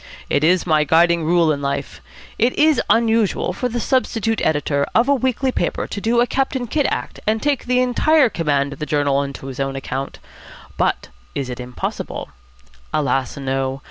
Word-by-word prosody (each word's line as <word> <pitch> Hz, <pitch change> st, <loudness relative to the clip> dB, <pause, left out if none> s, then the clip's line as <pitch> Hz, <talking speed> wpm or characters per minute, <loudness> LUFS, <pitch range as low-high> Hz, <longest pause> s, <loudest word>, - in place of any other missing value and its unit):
It 145 Hz, -, +2 dB
is 180 Hz, +3 st, +3 dB
my 155 Hz, -3 st, +3 dB
guiding 170 Hz, +2 st, +3 dB
rule 170 Hz, -1 st, +3 dB
in 140 Hz, -1 st, -2 dB
life. 140 Hz, 0 st, -3 dB, 0.4 s
It 235 Hz, +3 st, +3 dB
is 310 Hz, 0 st, +4 dB
unusual 225 Hz, -4 st, +2 dB
for 250 Hz, +6 st, -2 dB
the 240 Hz, +1 st, -3 dB
substitute 225 Hz, -3 st, 0 dB
editor 145 Hz, -2 st, +1 dB
of 230 Hz, +3 st, +4 dB
a 280 Hz, -, +4 dB
weekly 260 Hz, 0 st, 0 dB
paper -, -, -1 dB
to 200 Hz, -, -6 dB
do 235 Hz, +3 st, +2 dB
a -, -, +4 dB
Captain 265 Hz, 0 st, -1 dB
Kidd 285 Hz, +5 st, 0 dB
act -, -, -4 dB
and 220 Hz, +1 st, +2 dB
take 280 Hz, -1 st, -1 dB
entire 255 Hz, +4 st, +3 dB
command 145 Hz, -8 st, 0 dB
of 140 Hz, -, -13 dB
the 150 Hz, -, -4 dB
journal 145 Hz, -2 st, +1 dB
on 140 Hz, 0 st, -1 dB
his 135 Hz, -1 st, -8 dB
own 135 Hz, 0 st, -2 dB
account; 135 Hz, 0 st, -4 dB, 0.6 s
but -, -, -1 dB, 0.3 s
is 130 Hz, -2 st, -3 dB
it 125 Hz, -, -7 dB
impossible? 125 Hz, 0 st, -5 dB, 0.6 s
Alas 135 Hz, -3 st, 0 dB
no. 135 Hz, 0 st, -2 dB
170 Hz, 175 wpm, -20 LUFS, -, 0.6 s, is